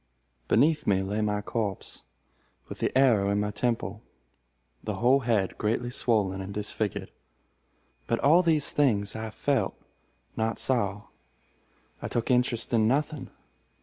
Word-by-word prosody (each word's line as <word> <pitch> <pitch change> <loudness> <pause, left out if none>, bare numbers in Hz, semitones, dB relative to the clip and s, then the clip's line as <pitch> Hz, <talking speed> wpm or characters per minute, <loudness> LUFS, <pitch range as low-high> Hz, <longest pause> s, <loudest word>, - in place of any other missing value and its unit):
Beneath 150 +1 +2
me 95 -1 +2
lay 105 +3 -2
my 105 -1 0
corpse, 105 -2 -4 0.7
with - - -8
the - - +1
arrow 115 -7 +4
in 100 0 +1
my 105 0 -1
temple, 110 -2 -2 0.8
the - - -3
whole 125 +4 +3
head 115 -7 -1
greatly 115 +3 -1
swollen 100 -6 +1
and 95 +1 -6
disfigured. 105 0 -3 1.0
But 115 - +1
all 160 +6 +5
these 160 -4 +3
things 105 -8 +1
I 110 0 -4
felt—not 110 +1 -4
saw. 105 -6 0 1.0
I - - -4
took 120 +2 -1
interest 125 -1 +1
in 110 -2 +3
nothing. 145 +3 -1
110 Hz, 130 wpm, -27 LUFS, 105-125 Hz, 1.0 s, all